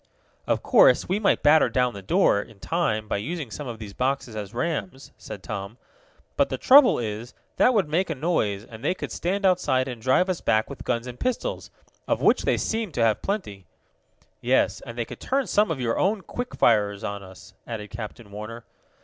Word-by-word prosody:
"Of - - 0
course - - +5
we 190 +3 0
might 215 - +2
batter 155 +2 +5
down 125 -2 +1
the 100 - -8
door, 100 +1 +3
in 110 -2 -14
time, 110 +5 -1
by - - -1
using 140 +3 -4
some 145 +5 -6
of 120 -2 -6
these 105 -2 -9
boxes 130 -2 -2
as 105 -2 -5
rams," 135 - -4
said 95 - -9
Tom. 100 +1 -6 0.6
"But - - +3
the - - -3
trouble 265 -1 +7
is, 110 +1 -5 0.2
that 250 - +4
would 195 -7 +2
make 170 +5 0
a 160 - -2
noise, 115 - -1
and 110 0 -12
they 180 - +1
could - - -6
stand 195 +3 -1
outside 175 -8 +2
and 125 -3 -6
drive 130 +9 +3
us 185 -2 -2
back 110 +4 +1
with 140 - -9
guns 120 -1 -1
and 125 -1 -8
pistols, 255 - -2 0.4
of - - +1
which - - +3
they - - +2
seem 220 -4 -2
to 120 - +1
have 110 -2 +2
plenty." 105 - -4 0.7
"Yes, - - +2
and 115 0 -8
they 120 - -1
could - - -10
turn 270 0 0
some 210 +1 +2
of 160 -5 -2
your 115 -2 -1
own 200 +1 +1
quick 245 +6 -6
firers 105 -3 +2
on 100 0 -4
us," 95 +1 -13
added 105 -3 -6
Captain 110 -1 -8
Warner. 110 +3 -8
120 Hz, 205 wpm, -25 LUFS, 105-180 Hz, 0.7 s, trouble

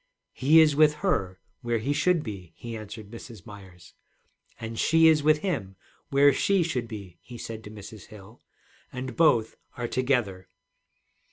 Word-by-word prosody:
'He 150 +5 +5
is 150 -2 +4
with 150 0 +4
her, 95 - -1 0.2
where 120 -1 -1
he 135 +6 -1
should 165 +2 +1
be,' 95 -6 -8
he 115 -1 -8
answered 110 -1 -9
Mrs. 115 -5 -11
Myers, 95 -4 -14 0.7
'and 115 -1 -6
she 165 0 +4
is 155 -2 +5
with 155 +1 +3
him, 115 - -3 0.3
where 140 0 +5
she 195 +6 +2
should 130 -8 -3
be,' 100 -6 -10
he 120 - -11
said 110 -1 -7
to - - -8
Mrs. 105 -1 -11
Hill, 105 +2 -15 0.5
'and 130 0 -6
both 120 -9 +2 0.2
are 120 -1 -3
together.' 120 -8 -1
120 Hz, 160 wpm, -26 LUFS, 105-145 Hz, 0.7 s, He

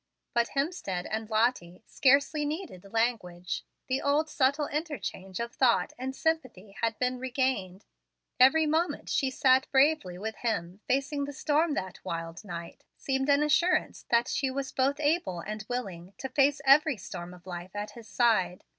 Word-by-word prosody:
But 235 -1 +2
Hemstead 275 - -2
and 220 0 -3
Lottie 215 -5 0
scarcely 285 +3 +3
needed 290 - -5
language. 195 -7 -1 0.2
The 260 +1 0
old, 295 +2 +1
subtile 280 +2 +2
interchange 285 - -4
of 235 0 -3
thought 250 -3 +2
and 265 +1 -5
sympathy 255 - -2
had 230 -1 0
been 250 0 -1
regained. 255 -7 -1 0.5
Every 305 +5 +6
moment 320 +3 0
she 265 -1 +1 0.4
bravely 275 - +3
sat - - -10
with 220 +2 -4
him 200 -5 -3
facing 280 +2 0
the 285 - -7
storm 300 +2 +1
that 185 -1 -5
wild 165 +2 -5
night 170 -4 -8
seemed 270 +1 -1
an 285 +1 +5
assurance 340 +4 +1
that 235 0 +3
she 270 - 0
was 270 +1 -3
both 275 +2 +1
able 300 - 0
and 215 +3 -6
willing 195 -7 -5
to 265 - -5
face 280 +1 +2
every 275 0 +5
storm 175 -2 -7
of 180 -1 -14
life 180 +1 -7
at 205 +1 -4
his 230 +1 -12
side. 225 -8 +2
250 Hz, 160 wpm, -29 LUFS, 195-285 Hz, 0.5 s, Every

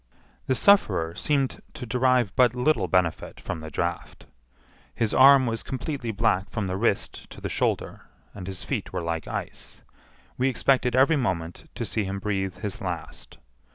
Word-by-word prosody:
The 130 - +2
sufferer 100 - +4
seemed 140 - 0
to - - -6
derive 125 -3 +2
but 125 -1 +4
little 125 -6 +1
benefit 85 -2 0
from - - -5
the 80 0 -8
draught. 85 +3 -4 0.7
His 115 -3 0
arm 135 0 +7
was 115 -1 -2
completely 130 -1 -4
black 105 -3 +1
from 110 - -3
the 95 0 -2
wrist 100 0 -1
to - - -11
the - - -4
shoulder, - - -2 0.3
and 95 -3 -8
his 95 -1 -6
feet - - -3
were - - -3
like 85 -1 -3
ice. - - -7 0.6
We 130 +1 +3
expected 125 -1 +2
every 140 +5 +5
moment 90 -9 -3
to - - -3
see 110 - -1
him 95 0 -3
breathe 95 -2 -2
his 105 0 -5
last. 90 -9 -6
110 Hz, 165 wpm, -25 LUFS, 90-130 Hz, 0.7 s, arm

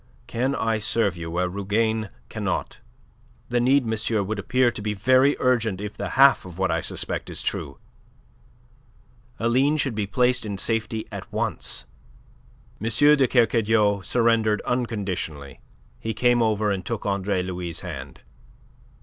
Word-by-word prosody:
Can 130 +4 -1
I 110 -1 0
serve 105 -3 +1
you 85 -1 -6
where 90 +2 0
Rougane 105 +3 -1 0.2
cannot? - - -3 0.7
The 120 - +1
need, 130 +1 +3
monsieur, 110 -1 0
would 105 +2 -3
appear 125 +5 +2
to 105 - -7
be 105 0 -2
very 130 +7 +4
urgent 115 -6 +1
if 105 0 -6
the - - -4
half 135 0 +6
of 90 -2 -11
what 95 -2 +1
I 80 +1 0
suspect - - -4
is - - -5
true. 70 - -3 1.6
Aline 130 +6 +2
should 135 -4 0
be 105 -2 -2
placed 125 +4 +1
in 100 -2 -4
safety 110 +1 -1
at - - -8
once." - - -2 1.0
M. - - -1
de 145 +3 +5
Kercadiou 110 -4 +2
surrendered 115 0 +2
unconditionally. 95 - -3 0.4
He 110 -1 -4
came 120 +1 +3
over 110 -2 +1
and 95 -1 -2
took 115 +1 -4
Andre 100 -2 0
Louis' 90 -2 -5
hand. - - -8
110 Hz, 145 wpm, -24 LUFS, 100-120 Hz, 1.6 s, half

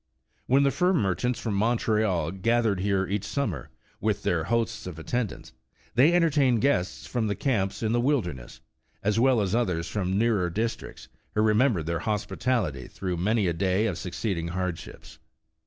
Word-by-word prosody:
When 135 +2 +4
the 140 - +3
fur 180 +4 +2
merchants 115 - 0
from 110 - -2
Montreal 105 -6 +1
gathered 110 +1 +1
here 95 0 +1
each 100 +2 -2
summer, 105 - -3 0.3
with 105 -1 -1
their 80 -2 0
hosts 115 -2 -1
of 90 -3 -7
attendants, 110 - -4 0.4
they 135 +8 +5
entertained 145 -9 +3
guests 95 -10 0
from 120 -3 -1
the 100 - -1
camps 105 -7 -1
in 110 - +1
the 120 +1 +2
wilderness, 95 - -2 0.4
as 105 +2 +1
well 130 -1 +4
as 100 -1 -1
others 90 -8 0
from 95 +1 -1
nearer 105 -5 +2
districts, 110 +6 -4 0.3
who 105 - +3
remembered 110 - +3
their 85 0 -1
hospitality 105 - -1
through 90 -2 -4
many 105 +4 +1
a 85 - +1
day 95 +4 +1
of 100 -6 -1
succeeding 90 -2 -3
hardships. 90 -1 -5
105 Hz, 160 wpm, -27 LUFS, 90-120 Hz, 0.4 s, they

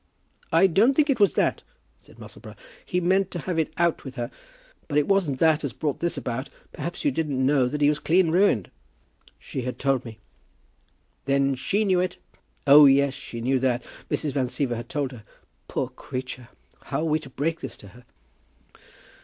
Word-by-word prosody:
"I 165 +4 +5
don't 205 +9 +4
think 295 -1 +3
it 255 - -1
was 205 - +4
that," - - +1 0.4
said - - -20
Musselboro. - - -12 0.3
"He 180 - -1
meant 185 +2 +2
to 180 - -6
have 175 0 -2
had 160 - +1
it - - -28
out 170 -1 +1
with 135 -1 -8
her; 120 -1 -4 0.6
but 145 - -1
it 150 - +2
wasn't 190 -9 +1
that 160 +1 +3
as 140 -5 -3
brought 150 -3 -3
this 170 0 -2
about. 130 +3 -4 0.2
Perhaps 170 - -6
you 290 - +3
didn't 145 - -1
know 135 -2 +3
that 150 +4 -4
he 145 - +5
was 150 0 +2
clean 170 +1 +2
ruined?" 175 - +2 0.7
"She 130 - -6
had 125 +1 -4
told 135 -2 0
me." 115 -2 -10 1.1
"Then 140 0 +2
she 200 +11 0
knew 185 -2 +3
it?" 180 0 -1 0.5
"Oh, 145 +1 +9
yes; 140 0 +4
she 115 -3 -8
knew 130 +2 +1
that. 125 -1 0 0.3
Mrs. 150 - 0
Van 130 -1 0
Siever 125 -1 -1
had 120 +1 -7
told 140 -3 -2
her. 120 -5 -11 0.4
Poor - - -2
creature! 125 -1 -7 0.4
How 140 +1 -2
are - - -1
we 155 -1 +1
to 150 -4 -11
break 155 +5 -2
this - - -7
to 100 - -13
her?" 125 +4 -17
145 Hz, 195 wpm, -25 LUFS, 130-170 Hz, 1.1 s, Oh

